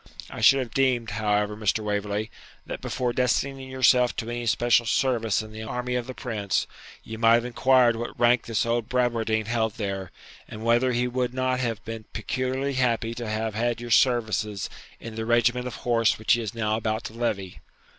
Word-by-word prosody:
I - - -7
should 135 - +7
have 125 -4 -3
deemed, 125 -4 +1
however, 105 -1 0
Mr. 110 0 0
Waverley, 105 +1 -2 0.3
that - - -6
before 125 -2 -2
destining 130 +2 0
yourself 125 -1 +3
to 115 - -4
any 120 0 -4
special 120 0 +3
service 115 -5 +1
in 110 - -11
the 110 0 -8
army 125 +2 -3
of 125 0 -2
the 130 - -7
Prince, 105 -6 -1 0.4
ye 110 - -7
might 115 0 +5
have 120 0 +1
inquired 125 -1 +3
what 120 +1 -6
rank 120 0 +3
the 115 -2 -3
old 115 0 -1
Bradwardine 115 -3 0
held 110 -1 -1
there, 100 -3 -4 0.4
and 110 +1 -8
whether 120 +2 +3
he 125 +1 0
would 125 0 -2
not 130 0 0
have 115 -2 -3
been 115 -1 -6
peculiarly 130 +4 -2
happy 120 -3 0
to 115 -2 -5
have 110 0 -2
had 120 +2 -1
your 120 0 -7
services 110 -4 +1 0.3
in 115 - -8
the 110 0 -4
regiment 120 +1 +2
of 120 - -6
horse 115 -2 +1
which 110 - +2
he 120 - +1
is 110 -1 -5
now 110 -1 0
about 110 -1 -2
to - - -7
levy.' 105 -6 -3
115 Hz, 195 wpm, -25 LUFS, 110-125 Hz, 0.4 s, should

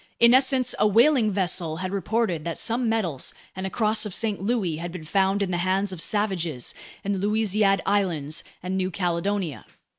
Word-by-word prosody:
In 235 +1 +7
essence, 260 -1 +4
a 210 - +5
whaling 230 +1 +4
vessel 175 -4 0
had 185 +1 -4
reported 200 -4 -1
that 170 0 -4
some 235 0 +1
medals 180 -12 -2 0.2
and 190 +1 -3
a - - -4
Cross 215 0 +1
of 195 - -6
St. 215 -4 -1
Louis 195 -7 0
had 170 +1 -5
been 175 -2 -7
found 195 +3 +1
in 190 - -2
the 175 - 0
hands 190 +2 0
of 180 -3 -7
savages 175 - -1 0.3
in 200 - -1
the 195 - -1
Louisiade 205 -1 +2
Islands 170 -7 0 0.2
and 185 +1 -2
New 185 -1 0
Caledonia. 175 - -2
195 Hz, 185 wpm, -25 LUFS, 175-215 Hz, 0.3 s, In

